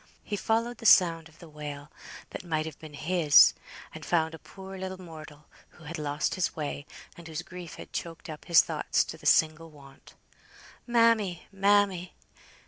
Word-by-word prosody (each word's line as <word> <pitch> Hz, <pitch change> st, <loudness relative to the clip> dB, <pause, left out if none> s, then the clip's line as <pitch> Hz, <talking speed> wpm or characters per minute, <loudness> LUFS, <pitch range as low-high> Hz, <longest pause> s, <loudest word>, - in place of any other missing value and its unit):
He 210 Hz, -, -3 dB
followed 230 Hz, +4 st, -1 dB
the 230 Hz, -, 0 dB
sound 165 Hz, -4 st, +5 dB
of 155 Hz, -, -22 dB
the 170 Hz, -, -13 dB
wail, 150 Hz, -1 st, -8 dB, 0.4 s
that -, -, -7 dB
might 155 Hz, -3 st, -1 dB
have 160 Hz, -2 st, -8 dB
been 155 Hz, -2 st, -11 dB
his, 155 Hz, -1 st, +5 dB, 0.4 s
and -, -, -9 dB
found 160 Hz, -2 st, +1 dB
a 160 Hz, -, -9 dB
poor 190 Hz, 0 st, -11 dB
little 190 Hz, 0 st, -6 dB
mortal, 155 Hz, -4 st, -12 dB, 0.3 s
who 175 Hz, -, -17 dB
had 160 Hz, +1 st, -6 dB
lost 145 Hz, 0 st, -1 dB
his 185 Hz, -2 st, -1 dB
way, 145 Hz, -2 st, -5 dB, 0.3 s
and 170 Hz, -1 st, -12 dB
whose 160 Hz, +1 st, -5 dB
grief 180 Hz, -2 st, -9 dB
had -, -, -12 dB
choked 165 Hz, -1 st, -6 dB
up 155 Hz, -2 st, -9 dB
his 170 Hz, -2 st, +6 dB
thoughts -, -, 0 dB
to -, -, -8 dB
the -, -, -4 dB
single 160 Hz, +1 st, +3 dB
want, 140 Hz, -3 st, -17 dB, 0.7 s
"Mammy, 230 Hz, -7 st, +2 dB
mammy." 195 Hz, -2 st, +2 dB
165 Hz, 175 wpm, -28 LUFS, 155-190 Hz, 0.7 s, his